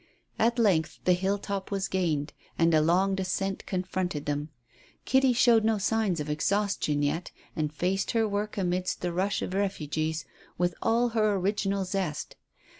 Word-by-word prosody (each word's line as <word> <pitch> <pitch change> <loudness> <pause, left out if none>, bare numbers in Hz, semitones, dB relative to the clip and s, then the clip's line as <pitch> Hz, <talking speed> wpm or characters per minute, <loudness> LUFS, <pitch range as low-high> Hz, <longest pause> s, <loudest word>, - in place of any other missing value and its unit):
At 235 +2 +3
length 185 -9 +2
the 180 - +5
hilltop 195 +1 -2
was 195 -1 -1
gained, 160 -6 -1 0.2
and 165 0 +3
a 155 - +5
long 180 +5 +3
descent 190 0 -2
confronted 180 -4 -2
them. 145 +1 -2 0.6
Kitty 265 -1 +4
showed 235 -2 +5
no 220 0 +2
signs 205 -3 0
of 150 - -3
exhaustion 155 -1 0
yet, 155 +5 -1 0.3
and 150 -2 -1
faced 185 +5 -1
her 225 -1 +2
work 210 +1 -3
amidst 185 -1 -1
the 175 -1 -2
rush 190 +3 0
of - - -4
refugees 160 -5 -1 0.3
with 175 0 +1
all 235 +2 +2
her 215 -2 +2
original 195 0 0
zest. 180 -5 -3
190 Hz, 155 wpm, -28 LUFS, 165-205 Hz, 0.6 s, the